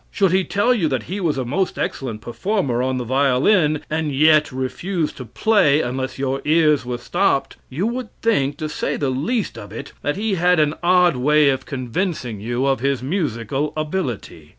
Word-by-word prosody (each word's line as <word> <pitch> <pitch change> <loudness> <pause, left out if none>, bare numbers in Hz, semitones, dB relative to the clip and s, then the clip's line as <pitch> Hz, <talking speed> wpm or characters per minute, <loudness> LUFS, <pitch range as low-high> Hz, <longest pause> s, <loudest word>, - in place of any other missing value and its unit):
Should 195 -4 +1
he 190 +1 +3
tell 205 +7 +2
you 195 -10 +1
that 130 -6 -1
he 190 - -5
was 165 -7 0
a 130 - -2
most 185 +10 -1
excellent 115 -5 -3
performer 130 - -1
on 130 0 0
the 125 - -2
violin, 140 - +2
and 155 -1 -2
yet 150 +2 +4
refused 155 +6 -3
to 125 - -7
play 150 - +3
unless 130 +1 -3
your 135 0 -2
ears 150 -2 +3
were 125 -1 -4
stopped, 175 +3 0
you 155 +10 -2
would 240 0 -3
think, 145 -12 +1
to 155 - -3
say 150 - -2
the 140 -3 -1
least 200 - -2
of 100 -1 -10
it, 115 - -8
that 145 - -1
he 215 0 -1
had 180 -1 +3
an 150 -1 +2
odd 180 -4 +4
way 150 +3 +4
of 130 -1 -2
convincing 130 - -3
you 120 +5 -2
of 135 -1 +1
his 135 -1 -1
musical 140 - -2
ability. 145 - -4
145 Hz, 190 wpm, -21 LUFS, 130-180 Hz, -, yet